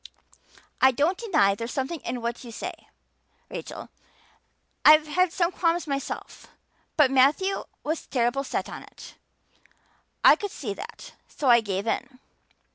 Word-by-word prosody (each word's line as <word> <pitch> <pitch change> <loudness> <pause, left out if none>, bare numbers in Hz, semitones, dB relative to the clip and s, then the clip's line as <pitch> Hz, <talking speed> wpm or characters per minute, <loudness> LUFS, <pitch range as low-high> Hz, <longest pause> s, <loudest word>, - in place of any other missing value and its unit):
"I 265 - +8
don't 290 +8 +1
deny 310 - +3
there's 230 +4 -5
something 275 +5 -3
in 245 -1 -5
what 235 +2 -3
you 240 - -9
say, - - -5 0.8
Rachel. - - -7 0.9
I've 305 0 +8
had 345 +4 +1
some 345 0 +1
qualms 340 -2 0
myself. 275 -3 -5 0.5
But 290 -4 +5
Matthew 290 +9 +3 0.2
was 315 +2 -3
terrible 245 +2 0
set - - -3
on - - -8
it. - - -13 1.1
I - - +9
could 410 - -4
see 225 - -5
that, 465 - -10
so 275 - -2
I 235 -1 +6
gave 200 -1 -3
in. 255 +3 -3
275 Hz, 140 wpm, -26 LUFS, 240-335 Hz, 1.1 s, I